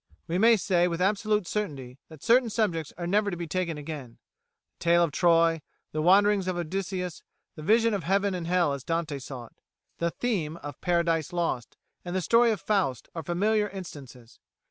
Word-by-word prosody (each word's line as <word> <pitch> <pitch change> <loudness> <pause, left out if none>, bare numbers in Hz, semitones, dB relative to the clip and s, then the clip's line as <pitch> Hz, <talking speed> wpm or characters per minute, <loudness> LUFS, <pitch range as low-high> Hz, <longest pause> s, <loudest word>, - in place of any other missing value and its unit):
We 175 +2 -1
may 230 +2 +6
say 180 -3 +2
with 170 -1 -3
absolute 210 +1 +1
certainty 140 -11 -4
that 155 -3 -13
certain 240 0 +4
subjects 175 -9 -1
are 175 - -4
never 205 +3 +2
to 175 - -4
be 170 - -4
taken 170 -1 -2
again. 145 -5 -7 0.6
The - - -9
tale 170 0 +5
of 165 - 0
Troy, 165 -1 +3 0.3
the 155 - -2
wanderings 195 +2 +4
of 185 -1 -1
Odysseus, 180 0 -3 0.3
the 155 - -10
vision 225 +6 +3
of 195 -4 -2
Heaven 195 +2 +1
and 175 -2 -4
Hell 175 -4 +2
as 140 -2 -6
Dante 165 -4 -2
saw 130 -2 -8
it, - - -22 0.4
the 170 - +1
theme 170 -7 -2
of 145 -3 -9
'Paradise 170 -3 +1
Lost,' 165 -9 -2 0.3
and 175 +1 -5
the 185 - +1
story 230 +7 +4
of 215 -4 0
Faust 185 - -1
are 165 - -4
familiar 210 +6 +1
instances. 140 - -10
175 Hz, 190 wpm, -27 LUFS, 155-200 Hz, 0.6 s, may